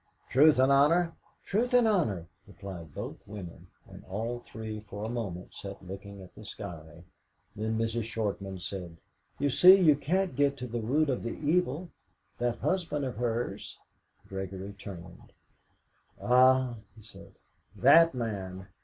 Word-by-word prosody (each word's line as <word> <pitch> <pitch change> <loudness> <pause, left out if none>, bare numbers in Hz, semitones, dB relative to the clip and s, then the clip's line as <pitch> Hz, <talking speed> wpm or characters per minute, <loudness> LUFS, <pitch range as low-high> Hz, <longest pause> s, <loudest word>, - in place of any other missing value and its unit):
"Truth 145 +4 +6
and 130 +1 +4
honour?" 165 +5 +4 0.3
"Truth 245 +5 +1
and 245 -2 +5
honour," 130 - +1 0.2
replied 90 -5 -9
both - - -7
women. 100 -5 -9 0.2
And - - -12
all 115 +5 -3
three 110 -2 -7
for 105 -1 -8
a - - -3
moment 100 -7 -5
sat 100 -1 -9
looking 100 +1 -9
at 90 - -15
the - - -12
sky. 80 0 -9 0.5
Then 110 +1 -2
Mrs. 115 0 -1
Shortman 100 -4 -3
said: 90 -3 -7 0.4
"You 145 0 +1
see, 185 +8 +8
you 155 -5 +6
can't 180 +3 -1
get 140 0 +2
to 125 - -5
the 120 -1 -4
root 140 +6 +1
of 125 - -2
the 115 - -4
evil 170 0 +1 0.5
that 120 -1 0
husband 165 -6 -1
of 125 -5 -5
hers." 120 0 -3 0.5
Gregory 95 +1 -6
turned. 95 -3 -11 0.9
"Ah," 130 0 +4 0.2
he 110 - -15
said, 100 -2 -13 0.4
"that 165 -2 +6
man! 95 -5 -5
115 Hz, 145 wpm, -29 LUFS, 100-140 Hz, 0.9 s, see